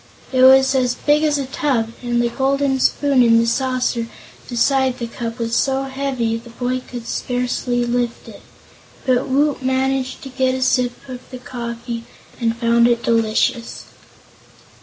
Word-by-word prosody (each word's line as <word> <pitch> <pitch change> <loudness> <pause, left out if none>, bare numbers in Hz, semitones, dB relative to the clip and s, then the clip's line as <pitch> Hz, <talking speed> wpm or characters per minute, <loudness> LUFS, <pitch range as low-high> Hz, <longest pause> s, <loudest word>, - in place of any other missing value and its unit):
It 255 - +3
was 265 +1 +7
as 250 -2 +1
big 295 +3 +2
as 300 -2 +2
a 275 - -2
tub, 255 -4 -1
and 240 -1 0
the 235 - +1
golden 270 +1 0
spoon 275 0 +2
in 230 -1 +5
the 230 - +3
saucer 250 -1 0 0.4
beside 260 +1 +1
the 240 - -4
cup 230 0 -6
was 230 -1 -2
so 270 +1 +1
heavy 265 -4 -2
the 235 +1 -12
boy 250 +2 -2
could 240 -2 -7
scarcely 245 0 -1
lift 240 -1 -2
it. - - -12 0.6
But 255 -1 +2
Woot 285 +1 +1
managed 260 0 -1
to 270 - -7
get 260 0 0
a 260 - -1
sip 250 +1 0
of 250 -1 -9
the 255 - -8
coffee 235 -1 -6 0.3
and 230 -1 0
found 235 0 +3
it 235 -1 +1
delicious. 230 +1 0
250 Hz, 160 wpm, -19 LUFS, 235-265 Hz, 0.6 s, was